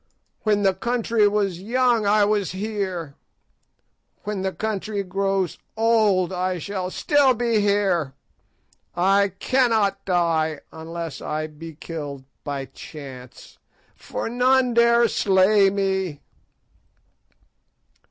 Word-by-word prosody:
When 210 -2 +1
the 195 -1 +4
country 230 +1 +1
was 200 -4 -1
young 235 0 +1
I 205 0 +4
was 205 -2 0
here; 190 -6 -4 1.1
when 210 -2 -3
the 190 0 -1
country 210 0 -3
grows 195 -1 -1 0.2
old 215 -5 +2
I 185 0 -1
shall 185 +1 -4
still 275 +5 +3
be 230 -2 +1
here. 195 -9 +1 0.8
I 195 +2 +3
cannot 220 -6 +1
die 165 -4 +1
unless 165 0 -7
I 155 +1 -3
be 155 +1 -10
killed 145 -4 -7 0.2
by 140 -2 -4
chance, 135 -2 -11 0.4
for - - -5
none 250 +1 +2
dare 235 0 +5
slay 195 0 +4
me." 190 -5 -1
195 Hz, 105 wpm, -23 LUFS, 170-215 Hz, 1.1 s, dare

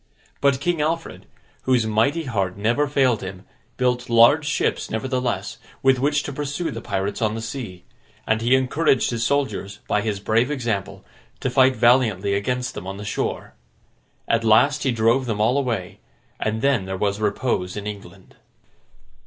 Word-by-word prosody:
But 140 -2 +3
King 170 +1 0
Alfred, 165 +2 -3 0.4
whose 125 -3 +3
mighty 115 +10 +1
heart 100 - -2
never 120 +8 +1
failed 130 -5 +2
him, 95 0 -8 0.3
built 125 -1 0
large 120 +6 +5
ships 150 - -1
nevertheless, 125 +2 -2 0.2
with 135 -1 +4
which 145 +2 +1
to 145 - -5
pursue 150 +4 -3
the - - -6
pirates 100 0 -3
on 110 -1 +1
the - - -4
sea; 110 -7 -6 0.4
and 110 0 +1
he 120 +3 +4
encouraged 130 +1 +2
his 115 -1 -2
soldiers, 110 -6 -1
by 105 - +1
his 105 -2 -2
brave 110 +5 +1
example, 115 -8 -3 0.4
to 130 - -1
fight 130 0 +4
valiantly 110 -6 +3
against 125 +5 -1
them 95 - -7
on 95 0 -5
the 105 - -7
shore. 105 - -3 0.7
At 115 0 +1
last, 125 +7 +4
he 130 - +1
drove 115 +3 +2
them 110 -3 -2
all 110 +4 +3
away; 115 -10 -2 0.4
and 110 +2 -2
then 135 -8 +2
there 95 0 -4
was 100 +1 -1
repose 105 -3 -1
in 105 - -5
England. 100 -2 -9
120 Hz, 165 wpm, -22 LUFS, 105-135 Hz, 0.7 s, large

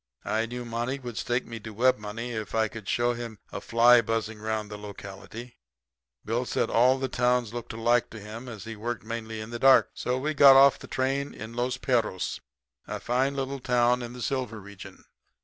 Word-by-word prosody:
I 110 +1 0
knew 120 +1 -6
Monty 120 +3 -2
would 120 -4 -8
stake 120 +2 -1
me 115 -1 -7
to 110 - -9
web 130 +1 +3
money 110 +3 -5
if 110 -2 -5
I 110 0 +3
could 110 -2 -10
show 120 0 +2
him 115 -2 -7
a - - -5
fly 120 +1 +6
buzzing 110 -1 -2
'round 110 -1 -3
the 105 - -6
locality. 105 +4 -9 0.7
Bill 115 +3 0
Bassett 125 - -4
said - - +1
all 130 +3 +3
towns 125 -2 +1
looked 120 -1 -6
alike 120 +1 +1
to 110 - -9
him 110 +4 -8
as 110 -5 -8
he 115 +1 -7
worked 120 +2 -4
mainly 110 0 -5
in 110 +1 -7
the 120 - -5
dark. 135 +1 +6
So 125 +1 -2
we 150 +4 -1
got 140 -2 +8
off 135 0 +7
the - - -10
train 135 +2 -1
in 110 +2 -8
Los 120 +1 -1
Perros, 115 -8 -1 0.5
a - - -4
fine 130 +3 0
little 135 0 -3
town 125 -1 +2
in 120 0 -6
the 125 -1 -7
silver 130 -5 -2
region. 100 -2 -12
120 Hz, 205 wpm, -27 LUFS, 110-125 Hz, 0.7 s, got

